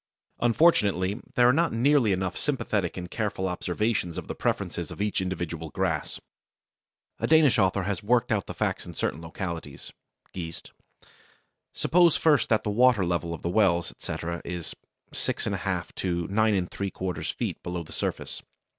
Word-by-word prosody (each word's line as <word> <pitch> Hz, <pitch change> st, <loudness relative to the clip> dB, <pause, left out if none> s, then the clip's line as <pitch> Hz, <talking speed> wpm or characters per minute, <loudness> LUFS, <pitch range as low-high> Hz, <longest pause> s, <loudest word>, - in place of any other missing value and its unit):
Unfortunately 105 Hz, -, +3 dB
there 120 Hz, 0 st, +6 dB
are 125 Hz, -, +6 dB
not 165 Hz, +4 st, +2 dB
nearly 125 Hz, -1 st, +3 dB
enough 95 Hz, -1 st, -1 dB
sympathetic 105 Hz, -, -1 dB
and 90 Hz, -1 st, -6 dB
careful 105 Hz, -3 st, -1 dB
observations 90 Hz, 0 st, -1 dB
of -, -, -5 dB
the -, -, -3 dB
preferences -, -, -2 dB
of -, -, -9 dB
each 105 Hz, -1 st, 0 dB
individual 85 Hz, -3 st, -3 dB
grass. 85 Hz, -2 st, -2 dB, 1.0 s
A -, -, 0 dB
Danish 155 Hz, -6 st, +5 dB
author 95 Hz, -1 st, +2 dB
has 100 Hz, +1 st, -2 dB
worked 120 Hz, +3 st, +2 dB
out 105 Hz, -3 st, 0 dB
the -, -, -6 dB
facts -, -, -1 dB
in -, -, -10 dB
certain 75 Hz, +5 st, -2 dB
localities 80 Hz, -3 st, -6 dB, 0.4 s
(Geest). 85 Hz, -3 st, -7 dB, 1.0 s
Suppose 175 Hz, -1 st, +4 dB
first 150 Hz, -4 st, +3 dB
that 110 Hz, -1 st, +3 dB
the 105 Hz, -, -1 dB
water 120 Hz, -3 st, +4 dB
level 85 Hz, -1 st, -1 dB
of 85 Hz, -, -6 dB
the 85 Hz, -, 0 dB
wells, 90 Hz, -3 st, +2 dB
etc., 85 Hz, +1 st, -5 dB
is 85 Hz, -1 st, -5 dB, 0.4 s
6 -, -, -1 dB
1/2 -, -, -2 dB
to 85 Hz, -2 st, -1 dB
9 105 Hz, -2 st, +2 dB
3/4 95 Hz, -2 st, -3 dB
feet -, -, -3 dB
below 90 Hz, -1 st, -4 dB
the 80 Hz, -, -15 dB
surface. -, -, -3 dB
95 Hz, 155 wpm, -27 LUFS, 85-115 Hz, 1.0 s, there